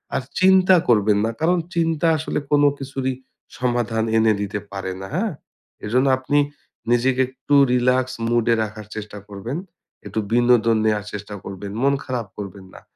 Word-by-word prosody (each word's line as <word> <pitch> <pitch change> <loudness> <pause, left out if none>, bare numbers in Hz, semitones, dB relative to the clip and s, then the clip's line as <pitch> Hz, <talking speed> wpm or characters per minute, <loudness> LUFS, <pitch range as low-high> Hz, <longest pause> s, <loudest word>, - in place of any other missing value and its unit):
আর - - +1 0.2
চিন্তা 190 0 +6
করবেন 105 -3 +4
না। 115 - -1
কারণ 175 +3 +3 0.2
চিন্তা 165 -1 +1
আসলে 155 0 -2
কোন 145 0 +4 0.2
কিছুরই 135 -1 -3 0.4
সমাধান 120 -3 0
এনে 110 -1 +4
দিতে 100 0 -3
পারেনা, 95 -1 -5
হ্যাঁ? 210 +4 0 0.5
এজন্য 125 +5 +2
আপনি 130 +3 0 0.5
নিজেকে 125 +2 +3
একটু 130 +2 -5 0.2
relax 125 +1 +3 0.2
mood 120 -1 +1
এ - - +3
রাখার 110 -1 -7
চেষ্টা 105 -1 -7
করবেন। 105 +8 -5 0.5
একটু 100 +2 -3
বিনোদন 120 -1 +4
নেয়ার 105 -2 +1
চেষ্টা 105 0 -6
করবেন। 100 +1 -7
মন 140 +1 +3
খারাপ 125 -4 -3
করবেন 100 -1 -8
না। - - -12
120 Hz, 155 wpm, -22 LUFS, 105-135 Hz, 0.5 s, চিন্তা